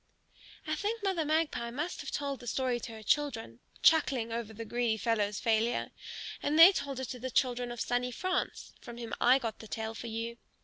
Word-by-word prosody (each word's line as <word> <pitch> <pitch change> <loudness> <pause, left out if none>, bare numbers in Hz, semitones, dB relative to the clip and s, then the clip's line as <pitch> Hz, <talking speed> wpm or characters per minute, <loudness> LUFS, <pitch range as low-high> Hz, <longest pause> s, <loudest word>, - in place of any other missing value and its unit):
I 310 - -1
think 415 +7 -2
Mother 380 -5 +1
Magpie 305 -6 0
must 300 +9 -3
have - - -6
told 280 -2 -3
the 245 - -11
story 250 0 0
to 230 - -7
her 220 -1 -9
children, 225 - 0 0.2
chuckling 270 -8 +4
over 230 -1 -3
the 225 +1 -7
greedy 235 0 0
fellow's 210 -2 0
failure. 230 0 +1 0.5
And 300 +2 +1
they 335 +4 +11
told 275 -8 -3
it 260 - -4
to 250 - -5
the 260 +2 -4
children 245 -1 +1
of 240 - -6
sunny 245 +2 0
France, 370 +9 -2
from 235 0 -9
whom 235 -1 -6
I 250 +2 +7
got 230 -5 -4
the 220 - -10
tale 220 +1 -4
for 235 - -7
you. 230 +1 -4
245 Hz, 205 wpm, -31 LUFS, 230-290 Hz, 0.5 s, they